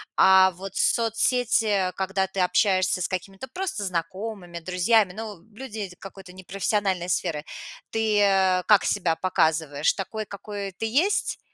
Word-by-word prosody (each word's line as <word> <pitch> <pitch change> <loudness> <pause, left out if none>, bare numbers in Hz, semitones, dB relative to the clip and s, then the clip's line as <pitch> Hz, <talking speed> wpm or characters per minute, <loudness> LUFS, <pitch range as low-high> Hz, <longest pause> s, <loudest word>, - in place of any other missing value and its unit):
А 190 0 +6
вот 190 +2 -9
соцсети, 225 -4 +2
когда 190 0 -1
ты 190 +1 -6
общаешься 185 0 +2
с - - 0
какими-то 195 +5 -6
просто 365 - -3
знакомыми, 185 0 -5
друзьями, 185 +3 +2
ну 210 -3 -8
люди 215 -5 -7
какой-то 195 -2 -11
непрофессиональной 190 0 -2
сферы. 160 -4 -1 0.5
Ты, 220 -2 +1
э, 190 -2 +3
как 210 -2 +5
себя 175 -5 +1
показываешь? 160 -5 +1
Такой, 215 +2 -5
какой 200 0 -7
ты 205 - -5
есть? 310 - +1
195 Hz, 130 wpm, -25 LUFS, 185-215 Hz, 0.5 s, А